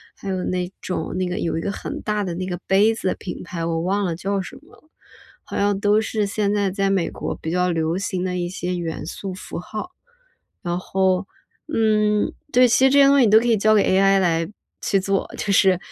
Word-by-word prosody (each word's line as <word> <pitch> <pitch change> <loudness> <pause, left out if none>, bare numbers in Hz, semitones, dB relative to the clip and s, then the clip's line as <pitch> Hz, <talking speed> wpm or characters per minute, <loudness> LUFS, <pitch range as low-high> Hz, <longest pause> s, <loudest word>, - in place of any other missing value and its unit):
还 195 - -7
有 185 -1 -2
那 180 0 -2
种， 180 - -4
那 185 - 0
个 180 +4 -3
有 165 -4 -1
一 - - -2
个 200 - -2
很 - - -6
大 210 -1 -1
的 175 -3 -4
那 185 +1 -3
个 180 -1 -3
杯 205 +4 +4
子 205 - -4
的 - - -1
品 180 - -7
牌， 170 -2 -5
我 165 -1 -1
忘 195 +3 0
了 170 - -1
叫 195 +3 -2
什 255 +8 -9
么 310 - -20
了， - - -24 0.6
好 - - -6
像 205 0 +2
都 205 +1 +3
是 215 -1 -1
现 205 0 0
在 205 -2 +1
在 195 0 0
美 190 -4 +1
国 - - -5
比 160 - -6
较 180 0 +1
流 165 +1 0
行 185 -2 -2
的 180 -1 -2
一 175 0 -2
些 180 0 -3
元 165 -3 -4
素 190 +2 -6
符 185 - -7
号。 215 - -6 0.7
然 175 0 -2
后， 190 0 0 0.4
嗯， 215 -5 +2 0.2
对， 250 +1 +6
其 260 +3 +4
实 - - +6
这 280 - +3
些 275 - +8
东 280 0 +5
西 250 - +6
你 215 - +3
都 215 - +7
可 240 - -2
以 225 -2 +4
交 215 +2 +4
给 205 - +4
AI 195 +1 +4
来 165 -2 +1 0.3
去 195 - +1
做。 195 0 -1
就 205 - -2
是 190 -2 +4
195 Hz, 260 characters per minute, -22 LUFS, 180-210 Hz, 0.7 s, 些